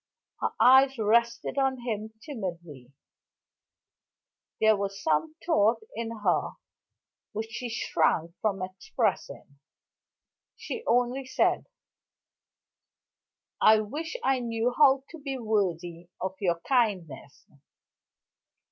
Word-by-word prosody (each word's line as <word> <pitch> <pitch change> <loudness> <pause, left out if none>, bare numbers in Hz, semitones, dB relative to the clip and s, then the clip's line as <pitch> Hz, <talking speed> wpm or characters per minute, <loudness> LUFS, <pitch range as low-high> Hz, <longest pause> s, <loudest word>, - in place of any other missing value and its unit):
Her - - 0
eyes 265 +1 +6
rested 235 +4 +1
on 265 -2 0
him 220 -2 -4
timidly; 175 - -7 1.7
there 220 0 +5
was 200 -1 -4
some 160 - 0
thought 225 -8 +2
in 230 0 -3
her - - +1 0.8
which 220 +1 -4
she 245 +1 -5
shrank 170 -7 0
from 200 -3 -1
expressing. 185 - -3 1.0
She 460 - -6
only 250 +2 +1
said: 260 - +1 1.9
"I 215 0 +6
wish 300 - -5
I 270 -1 +2
knew 235 0 -1
how 270 -2 +5
to 330 - -10
be 275 -2 -4
worthy 175 -7 -2
of 190 +1 -3
your 175 -4 0
kindness." 185 - -1
220 Hz, 100 wpm, -28 LUFS, 185-255 Hz, 1.9 s, eyes